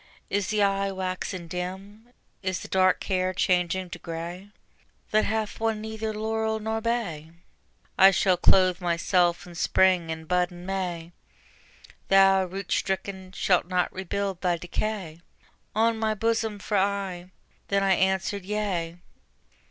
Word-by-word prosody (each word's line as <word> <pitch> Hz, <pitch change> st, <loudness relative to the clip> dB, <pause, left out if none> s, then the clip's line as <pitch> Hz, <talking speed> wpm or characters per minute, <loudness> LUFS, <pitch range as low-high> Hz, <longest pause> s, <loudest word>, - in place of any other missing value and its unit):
Is 200 Hz, -1 st, 0 dB
the 215 Hz, -1 st, +2 dB
eye 195 Hz, 0 st, +1 dB
waxen 185 Hz, -1 st, -4 dB
dim, 190 Hz, +6 st, -6 dB, 0.3 s
is 185 Hz, -2 st, -2 dB
the -, -, -7 dB
dark 185 Hz, -1 st, +3 dB
hair 185 Hz, -1 st, 0 dB
changing 180 Hz, 0 st, +1 dB
to -, -, -7 dB
gray 170 Hz, +4 st, -6 dB, 0.6 s
That 215 Hz, 0 st, +3 dB
hath 220 Hz, 0 st, -2 dB
won 225 Hz, -1 st, 0 dB
neither 220 Hz, 0 st, -4 dB
laurel 220 Hz, +1 st, -1 dB
nor 220 Hz, +1 st, -2 dB
bay? 210 Hz, -10 st, -2 dB, 0.7 s
I 195 Hz, -, +10 dB
shall 190 Hz, 0 st, +3 dB
clothe 185 Hz, +1 st, +4 dB
myself 175 Hz, 0 st, +1 dB
in 175 Hz, -, -11 dB
Spring 180 Hz, 0 st, +3 dB
and 160 Hz, 0 st, -5 dB
bud 180 Hz, +1 st, +1 dB
in 175 Hz, 0 st, -10 dB
May: 180 Hz, -3 st, -3 dB, 1.0 s
Thou, 195 Hz, -1 st, +5 dB
root 190 Hz, +2 st, -7 dB
stricken, 190 Hz, -1 st, -2 dB
shalt 180 Hz, -3 st, +2 dB
not 180 Hz, -1 st, 0 dB
rebuild 190 Hz, 0 st, -3 dB
thy 175 Hz, -2 st, +1 dB
decay 175 Hz, -1 st, -4 dB, 0.5 s
On 225 Hz, +1 st, +2 dB
my 220 Hz, -1 st, 0 dB
bosom 225 Hz, -1 st, 0 dB
for 205 Hz, +1 st, -1 dB
aye. 190 Hz, -2 st, -1 dB, 0.4 s
Then 200 Hz, 0 st, +1 dB
I 195 Hz, -1 st, +4 dB
answered: 190 Hz, +1 st, 0 dB
Yea. 185 Hz, -5 st, -2 dB
190 Hz, 140 wpm, -26 LUFS, 180-205 Hz, 1.0 s, I